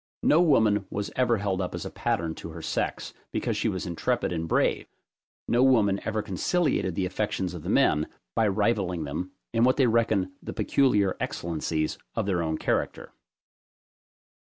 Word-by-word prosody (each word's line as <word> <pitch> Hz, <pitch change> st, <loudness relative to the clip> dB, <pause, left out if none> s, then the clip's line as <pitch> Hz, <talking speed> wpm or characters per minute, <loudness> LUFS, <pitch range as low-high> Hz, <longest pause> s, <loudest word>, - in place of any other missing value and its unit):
No 160 Hz, -, +5 dB
woman 110 Hz, -, +3 dB
was 100 Hz, 0 st, -3 dB
ever 125 Hz, -2 st, +2 dB
held 100 Hz, -2 st, -1 dB
up 90 Hz, -, -3 dB
as -, -, -5 dB
a -, -, -5 dB
pattern 80 Hz, -1 st, -1 dB
to 85 Hz, -, -8 dB
her 80 Hz, 0 st, -8 dB
sex, -, -, -2 dB, 0.2 s
because -, -, -1 dB
she -, -, 0 dB
was 95 Hz, -, -3 dB
intrepid 85 Hz, 0 st, -1 dB
and 80 Hz, -1 st, -2 dB
brave; -, -, +1 dB, 0.6 s
no 120 Hz, -, +3 dB
woman 110 Hz, -7 st, +4 dB
ever 110 Hz, -1 st, -1 dB
conciliated 100 Hz, -, 0 dB
the 95 Hz, -, 0 dB
affections 95 Hz, -1 st, -2 dB
of 85 Hz, -, -7 dB
the -, -, -5 dB
men, 75 Hz, 0 st, +3 dB, 0.3 s
by 110 Hz, -, +3 dB
rivalling 100 Hz, -4 st, 0 dB
them 80 Hz, +6 st, -4 dB, 0.2 s
in 115 Hz, 0 st, +3 dB
what 130 Hz, +1 st, +4 dB
they 135 Hz, -, +4 dB
reckon 110 Hz, -5 st, +2 dB
the -, -, -6 dB
peculiar 105 Hz, -9 st, +2 dB
excellencies 80 Hz, -2 st, -2 dB, 0.2 s
of -, -, 0 dB
their 95 Hz, -3 st, 0 dB
own 80 Hz, -1 st, -1 dB
character. -, -, -2 dB
100 Hz, 170 wpm, -27 LUFS, 85-115 Hz, 0.6 s, No